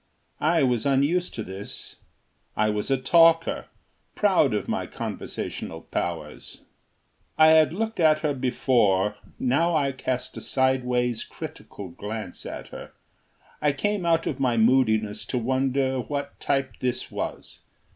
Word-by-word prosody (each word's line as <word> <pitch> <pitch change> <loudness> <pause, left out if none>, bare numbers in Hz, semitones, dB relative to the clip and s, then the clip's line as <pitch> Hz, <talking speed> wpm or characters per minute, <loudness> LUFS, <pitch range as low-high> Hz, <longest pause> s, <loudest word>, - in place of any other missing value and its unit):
I 160 0 +3
was 125 -4 +1
unused 145 +7 +1
to 110 - -3
this. 95 +1 -7 0.6
I 110 0 +3
was 105 +3 -3
a 135 - +3
talker, 165 +4 +4 0.5
proud 185 -10 +3
of 105 - -2
my - - -2
conversational 80 - -5
powers. - - -5 0.7
I 155 0 +7
had 160 -1 +6
looked 220 +4 -3
at 155 -2 +4
her 150 -2 +1
before; 120 -6 +2 0.2
now 165 +7 +2
I 140 -3 +2
cast 130 -1 -3
a - - -6
sideways, 125 -3 +1
critical 100 -3 -9
glance 105 +5 -7
at - - -7
her. - - -10 0.7
I 145 -1 +2
came 205 +6 -1
out 165 -1 +2
of 135 - -3
my 125 -3 +1
moodiness 110 -3 +3
to 125 - -2
wonder 130 +2 0
what 140 +3 -4
type 135 -1 -1
this 125 -1 -2
was. - - -5
130 Hz, 135 wpm, -25 LUFS, 120-155 Hz, 0.7 s, I